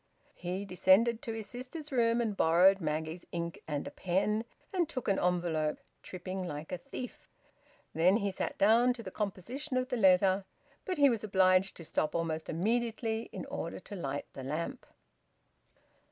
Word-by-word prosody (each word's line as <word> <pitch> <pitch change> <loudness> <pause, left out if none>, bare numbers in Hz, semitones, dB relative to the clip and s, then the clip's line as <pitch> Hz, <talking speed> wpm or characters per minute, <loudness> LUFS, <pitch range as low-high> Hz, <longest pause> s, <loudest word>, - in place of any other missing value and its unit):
He 180 +3 -4
descended 200 +5 +4
to 230 - -4
his 220 -1 -5
sister's 265 +7 -7
room 235 -2 +3
and 220 -3 -1
borrowed 185 +3 +5
Maggie's 160 +2 -2
ink 170 -1 -4
and 145 -2 -2
a - - -6
pen, 205 +5 0 0.3
and 350 -4 +1
took 255 -4 -4
an 195 - +2
envelope, 170 -4 +1 0.2
tripping 185 0 -5
like 150 0 -6
a 180 - -3
thief. 255 0 -8 0.6
Then 180 +5 +4
he 200 -3 -1
sat 185 - -3
down 230 +5 +5
to 240 -2 -9
the 185 - -7
composition 225 +8 -3
of 255 0 -1
the 250 - -1
letter; 190 -1 +5 0.4
but 370 -3 -2
he 285 -1 +7
was 225 -3 -2
obliged 190 -2 +3
to 165 - -9
stop 155 0 -1
almost 160 -1 -2
immediately 225 +4 -1
in - - -6
order - - -5
to 205 - -8
light 145 -6 -3
the 135 - -7
lamp. 155 +5 -4
195 Hz, 170 wpm, -32 LUFS, 170-230 Hz, 0.6 s, he